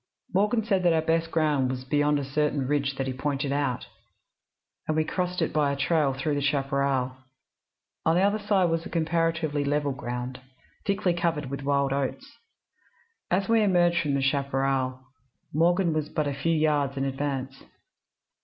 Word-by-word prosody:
Morgan 210 +4 +2
said 195 -4 +2
that 175 -2 +4
our 160 - +2
best 165 +1 +1
ground 150 -5 +1
was 130 0 -4
beyond 145 +2 +2
a 140 - -2
certain 145 -1 0
ridge 140 -1 0
that 135 - -2
he 130 - -2
pointed 140 +1 -2
out, 140 -4 -1 1.0
and 155 - 0
we 155 - +3
crossed 180 0 -1
it - - -2
by 150 -2 +2
a - - -1
trail 145 0 +2
through 135 +3 -2
the 145 - 0
chaparral. 140 -2 0 0.9
On 160 - +3
the 180 - +3
other 205 +2 +2
side 200 -4 +2
was 165 0 0
comparatively 165 -2 0
level 145 0 0
ground, 125 -1 -5 0.5
thickly 195 -3 +1
covered 165 -5 -1
with 140 - -4
wild 140 -1 +1
oats. 265 - -4 0.9
As 190 +2 +1
we 230 -1 +4
emerged 175 -4 +3
from 145 -3 0
the 135 - 0
chaparral, 135 -2 0 0.5
Morgan 170 +2 +3
was 155 -1 -2
but 155 -1 -1
a 140 - -1
few 140 +5 -1
yards 150 -3 +1
in 135 - 0
advance. 135 -1 -3
145 Hz, 170 wpm, -27 LUFS, 135-165 Hz, 1.0 s, that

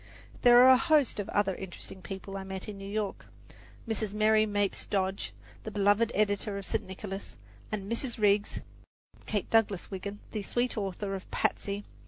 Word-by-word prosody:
There 240 -1 +8
are 260 - +9
a 260 - +8
host 305 -9 +3
of 205 - -3
other 200 -2 +2
interesting 190 0 -8
people 195 +1 -7
I 195 - -4
met 190 -1 -6
in 205 -2 -7
New 195 0 -7
York: 210 -1 -3 0.6
Mrs. 215 -2 -2
Mary 215 0 +4
Mapes 205 -1 0
Dodge, 190 -1 -1 0.3
the - - -4
beloved 205 +2 +3
editor 205 0 +1
of 200 - -5
St. - - -1
Nicholas, 195 +1 -7 0.3
and 210 -2 -2
Mrs. 235 +2 -1
Riggs 205 -1 +2 0.7
(Kate 205 -3 -1
Douglas 210 -5 +2
Wiggin), 200 +2 -5
the 215 - -3
sweet 240 +5 -1
author 195 -1 -3
of 190 -1 -6
"Patsy." 200 +1 -1
205 Hz, 170 wpm, -30 LUFS, 195-215 Hz, 0.7 s, are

